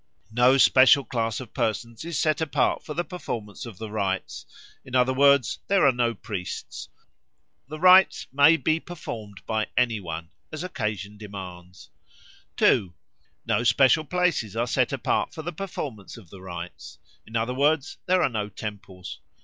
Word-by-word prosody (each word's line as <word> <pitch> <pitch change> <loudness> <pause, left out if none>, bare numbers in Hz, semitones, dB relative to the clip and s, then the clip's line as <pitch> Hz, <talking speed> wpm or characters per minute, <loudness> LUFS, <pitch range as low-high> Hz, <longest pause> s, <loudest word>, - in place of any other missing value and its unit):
No 125 +3 +4
special 130 +1 +6
class 115 -2 -2
of 125 -4 -10
persons 115 +2 -2
is 170 -2 -4
set 155 +2 +1
apart 160 -4 0
for 150 - -7
the 175 - 0
performance 120 - -6
of 110 -6 -10
the 110 0 -7
rites; 95 -3 -3 0.4
in 130 - -7
other 130 +1 +3
words, 140 -2 +4
there 195 -4 +3
are 135 - +6
no 120 -2 0
priests. 90 -2 -6 0.8
The 155 +2 -8
rites 185 +2 +6
may 145 +4 +6
be 155 +4 +1
performed 110 - -8
by 110 -1 -1
any 120 -3 +2
one, 85 -2 -7 0.2
as 155 +1 -5
occasion 105 - -4
demands. 90 -4 -10 0.7
2. 90 -4 +3 0.5
No 120 - +1
special 135 +5 +4
places 170 - 0
are 115 +1 0
set 125 0 +1
apart 135 -4 -1
for 160 - -6
the 175 +2 -5
performance 145 - -6
of 95 -8 -15
the 95 - -12
rites; 85 -5 -8 0.3
in 110 - -10
other 115 +2 0
words, 145 +3 +1
there 185 0 +3
are - - +2
no 105 -3 -3
temples. 100 -3 -8
120 Hz, 160 wpm, -25 LUFS, 105-145 Hz, 0.8 s, special